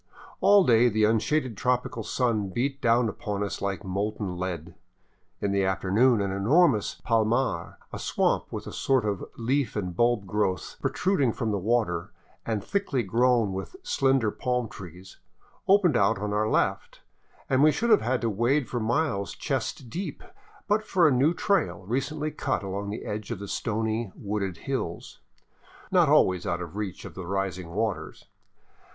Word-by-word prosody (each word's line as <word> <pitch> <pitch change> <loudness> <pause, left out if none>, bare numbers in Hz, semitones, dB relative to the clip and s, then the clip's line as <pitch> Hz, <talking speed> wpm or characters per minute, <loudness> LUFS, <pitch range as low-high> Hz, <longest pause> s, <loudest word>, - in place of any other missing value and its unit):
All 200 -1 +6
day 120 -4 +5
the 110 -1 +1
unshaded 115 +4 +1
tropical 125 +1 -1
sun 110 -3 0
beat 135 +7 -2
down 120 0 +3
upon 105 -1 -3
us 100 - -4
like 100 0 -2
molten 100 0 -3
lead. 90 -2 -4 0.7
In 100 - -1
the 100 0 +2
afternoon 100 +5 +2
an 100 -1 -1
enormous 110 - +3
palmar, 115 -5 0
— - - -35
a - - -5
swamp - - 0
with - - -5
a - - -7
sort 130 -5 +1
of 100 -3 -2
leaf 125 +1 0
and 90 -4 -3
bulb 120 -1 +2
growth 95 -1 -2
protruding 145 - +1
from 115 -3 -2
the 100 - -1
water 100 -5 0 0.4
and 110 -3 -1
thickly 175 - -1
grown 115 0 +2
with 95 - -6
slender 135 - +2
palm 125 0 -1
trees 90 -1 -11 0.2
— - - -31
opened 190 -6 +5
out 105 +1 +3
on 105 +1 -3
our 110 +1 +1
left 95 -2 -1 0.5
and 130 0 +2
we 155 +1 +6
should 235 +8 0
have - - +6
had 125 +3 0
to 115 - 0
wade 120 +7 +1
for 120 - -3
miles 115 -3 -1
chest 125 - -3
deep 160 - -5 0.4
but 210 +1 +2
for 180 -5 +3
a - - +4
new 135 +5 +3
trail 175 - 0
recently 145 +7 -2
cut 135 -6 -2
along 100 +1 -4
the 105 - -5
edge 105 0 -5
of 120 - -3
the 100 +2 -7
stony, 110 0 -2
wooded 100 -3 -3
hills, - - -4 0.7
not - - +4
always 90 -2 +3
out 85 - -1
of 90 +1 -7
reach 105 -4 -5
of - - -8
the 90 -2 -7
rising 95 -2 -2
waters. 105 +3 -3
110 Hz, 170 wpm, -27 LUFS, 100-130 Hz, 0.7 s, All